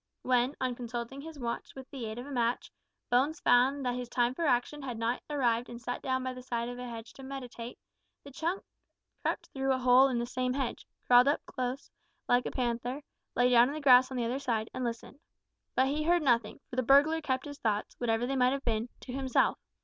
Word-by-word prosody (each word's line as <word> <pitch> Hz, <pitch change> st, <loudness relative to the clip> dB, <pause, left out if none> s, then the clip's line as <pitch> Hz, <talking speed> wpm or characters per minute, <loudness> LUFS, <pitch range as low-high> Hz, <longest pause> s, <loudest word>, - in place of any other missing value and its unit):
When, 250 Hz, +2 st, +2 dB
on 255 Hz, -1 st, 0 dB
consulting 240 Hz, +2 st, -5 dB
his 320 Hz, 0 st, -9 dB
watch, 235 Hz, -3 st, -4 dB
with 265 Hz, -1 st, -9 dB
the 255 Hz, -5 st, -5 dB
aid 220 Hz, +1 st, -6 dB
of 245 Hz, -, -6 dB
a 285 Hz, -, -9 dB
match, 240 Hz, -2 st, -1 dB, 0.4 s
Bones 280 Hz, +7 st, +2 dB
found 265 Hz, -1 st, +3 dB
that 245 Hz, -, +1 dB
his 250 Hz, -1 st, -5 dB
time 240 Hz, 0 st, +1 dB
for 330 Hz, +4 st, -1 dB
action 250 Hz, +4 st, +1 dB
had 250 Hz, -4 st, -5 dB
not 230 Hz, +2 st, -1 dB
arrived 245 Hz, -5 st, +1 dB
and 235 Hz, -, -8 dB
sat 245 Hz, +1 st, -4 dB
down 260 Hz, -1 st, -1 dB
by 255 Hz, 0 st, -3 dB
the 255 Hz, -, -9 dB
side 235 Hz, -1 st, -3 dB
of 245 Hz, 0 st, -7 dB
a 250 Hz, -1 st, -6 dB
hedge 225 Hz, -1 st, -8 dB
to -, -, -13 dB
meditate, 250 Hz, -3 st, -7 dB, 0.5 s
the 280 Hz, -, -11 dB
chunk 335 Hz, +7 st, -2 dB, 0.6 s
crept -, -, -2 dB
through 270 Hz, 0 st, 0 dB
a 260 Hz, -, +2 dB
hole 255 Hz, +1 st, +6 dB
in 255 Hz, -3 st, -1 dB
the 235 Hz, -, -1 dB
same 250 Hz, +1 st, -1 dB
hedge, 265 Hz, -3 st, -3 dB, 0.2 s
crawled 245 Hz, +2 st, +6 dB, 0.2 s
close 255 Hz, +2 st, -4 dB
up 340 Hz, 0 st, -45 dB
like 245 Hz, 0 st, +3 dB
a -, -, -4 dB
panther, 245 Hz, +3 st, -2 dB, 0.3 s
lay 245 Hz, 0 st, +4 dB
down 240 Hz, 0 st, +7 dB
in 285 Hz, -, -4 dB
the -, -, -3 dB
grass 255 Hz, -3 st, +6 dB
on 260 Hz, -, -5 dB
the 240 Hz, -, 0 dB
other 250 Hz, +4 st, -1 dB
side, 230 Hz, -5 st, -2 dB
and 255 Hz, -, -3 dB
listened. 235 Hz, +3 st, -5 dB, 0.6 s
But 260 Hz, -, +4 dB
he 295 Hz, +2 st, -1 dB
heard 340 Hz, +1 st, +2 dB
nothing, 235 Hz, -5 st, +1 dB
for 250 Hz, -, -9 dB
the -, -, +4 dB
burglar 285 Hz, +6 st, +5 dB
kept 260 Hz, -3 st, -1 dB
his 285 Hz, -1 st, -8 dB
thoughts, 210 Hz, -2 st, -1 dB
whatever 230 Hz, -1 st, +1 dB
they 270 Hz, +2 st, -1 dB
might 255 Hz, 0 st, +3 dB
have 275 Hz, 0 st, -4 dB
been, 230 Hz, 0 st, -1 dB
to 250 Hz, -, -8 dB
himself. 265 Hz, -1 st, +1 dB
250 Hz, 230 wpm, -30 LUFS, 240-275 Hz, 0.6 s, down